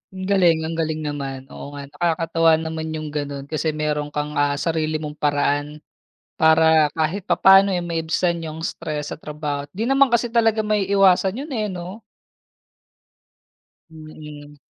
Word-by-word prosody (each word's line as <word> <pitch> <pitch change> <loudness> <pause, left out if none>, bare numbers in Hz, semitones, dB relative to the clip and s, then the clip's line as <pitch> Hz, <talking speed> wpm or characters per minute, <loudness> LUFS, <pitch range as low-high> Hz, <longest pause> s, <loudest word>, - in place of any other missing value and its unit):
Ang 185 - -6
galing, 175 -5 +3
ang 160 - -3
galing 155 -1 -2
naman, 140 -3 -4
oo 145 0 -9
nga. 140 - -7
Nakakatuwa 165 +1 +1
naman 160 0 -4
yung 155 -1 -5
ganun 145 -2 -4
kasi 155 +1 -2
meron 150 -1 -1
kang, 150 0 -3
ah, 145 0 +2
sarili 155 0 -1
mong 150 -1 -5
paraan 145 +1 -1 0.6
para 160 -1 +5
kahit 160 +5 -1
papaano 195 +1 +6
eh 175 - -3
maibsan 170 +1 -1
yung 160 0 -6
stress 150 -2 -4
sa 150 - -16
trabaho. 150 -1 -5
'Di 220 - -1
naman 270 0 +4
kasi 235 0 +2
talaga 225 -2 +2
maiiwasan 195 -1 +3
yun 295 - -9
eh 215 -2 -1
'no? 185 +4 -8 1.9
Mhm. 150 -2 -12
160 Hz, 145 wpm, -21 LUFS, 150-180 Hz, 1.9 s, papaano